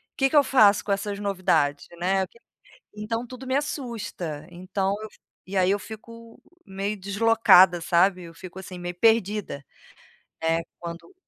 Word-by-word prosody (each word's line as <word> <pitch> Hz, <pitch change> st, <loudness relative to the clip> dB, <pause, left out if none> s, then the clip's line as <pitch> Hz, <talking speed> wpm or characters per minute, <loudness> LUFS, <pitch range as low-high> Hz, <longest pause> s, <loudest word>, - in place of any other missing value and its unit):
Que 270 Hz, 0 st, +2 dB
que -, -, -3 dB
eu 290 Hz, -, +7 dB
faço 210 Hz, -7 st, +5 dB
com 205 Hz, -, -3 dB
essas 200 Hz, +1 st, -2 dB
novidades, 170 Hz, -8 st, 0 dB
né? 190 Hz, +2 st, +1 dB
Aquilo 230 Hz, +5 st, -8 dB, 0.5 s
Então 225 Hz, +3 st, -3 dB
tudo 255 Hz, +1 st, -10 dB
me 260 Hz, -, -1 dB
assusta. 220 Hz, -, -4 dB
Então 190 Hz, +2 st, -2 dB, 0.5 s
e 195 Hz, -, -6 dB
aí 185 Hz, 0 st, +3 dB
eu 200 Hz, -, +2 dB
fico 230 Hz, +2 st, -12 dB, 0.2 s
meio 200 Hz, +2 st, -4 dB
deslocada, 200 Hz, -3 st, +5 dB
sabe? 180 Hz, +2 st, +2 dB
Eu 165 Hz, -1 st, -12 dB
fico 185 Hz, +1 st, -11 dB
assim 185 Hz, -1 st, -9 dB
meio 175 Hz, 0 st, -5 dB
perdida. 210 Hz, -7 st, +1 dB, 0.8 s
É, 165 Hz, +1 st, +1 dB, 0.2 s
quando 170 Hz, -, -8 dB
195 Hz, 150 wpm, -25 LUFS, 180-225 Hz, 0.8 s, eu